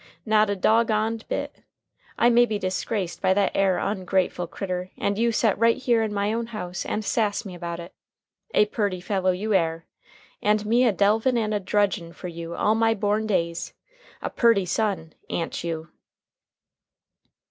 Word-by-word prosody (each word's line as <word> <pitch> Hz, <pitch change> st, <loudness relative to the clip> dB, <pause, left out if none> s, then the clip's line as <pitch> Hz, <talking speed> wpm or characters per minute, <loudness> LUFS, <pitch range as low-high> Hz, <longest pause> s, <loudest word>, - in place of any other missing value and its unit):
Not 215 Hz, -1 st, +3 dB
a 205 Hz, -, 0 dB
dog 220 Hz, +4 st, +3 dB
on'd 220 Hz, +1 st, -1 dB
bit. -, -, -3 dB, 0.6 s
I 240 Hz, -, +4 dB
may 240 Hz, +1 st, +5 dB
be 215 Hz, -2 st, -1 dB
disgraced 185 Hz, 0 st, -3 dB
by 190 Hz, -, +3 dB
that 200 Hz, -1 st, +2 dB
air 195 Hz, -2 st, +2 dB
ongrateful 185 Hz, -3 st, -1 dB
critter, 185 Hz, -1 st, -4 dB
and 200 Hz, -, 0 dB
you 230 Hz, +2 st, +2 dB
set 220 Hz, -3 st, +2 dB
right 230 Hz, 0 st, +4 dB
here 240 Hz, -3 st, +2 dB
in 220 Hz, -1 st, -1 dB
my 205 Hz, +1 st, 0 dB
own 230 Hz, 0 st, -2 dB
house 185 Hz, -6 st, -5 dB
and 215 Hz, 0 st, -2 dB
sass 215 Hz, 0 st, 0 dB
me 190 Hz, -, -7 dB
about 170 Hz, -1 st, -5 dB
it. 170 Hz, +1 st, -9 dB, 0.6 s
A 210 Hz, -, +6 dB
purty 205 Hz, -3 st, -2 dB
fellow 190 Hz, 0 st, 0 dB
you 205 Hz, +4 st, 0 dB
air! 165 Hz, -3 st, +1 dB, 0.6 s
An' 210 Hz, +1 st, +3 dB
me 240 Hz, +4 st, +3 dB
a -, -, +4 dB
delvin' 220 Hz, +6 st, +2 dB
and 215 Hz, -2 st, 0 dB
a 210 Hz, -, +1 dB
drudgin' 195 Hz, -4 st, 0 dB
fer 180 Hz, -, -7 dB
you 170 Hz, 0 st, -7 dB
all 215 Hz, -, +2 dB
my 225 Hz, 0 st, +2 dB
born 210 Hz, +1 st, 0 dB
days. 170 Hz, -4 st, -1 dB, 0.5 s
A -, -, -3 dB
purty 230 Hz, -5 st, +3 dB
son, 190 Hz, -4 st, -1 dB, 0.2 s
a'n't 165 Hz, -, -3 dB
you?" 165 Hz, -1 st, -4 dB
205 Hz, 175 wpm, -25 LUFS, 180-220 Hz, 0.6 s, A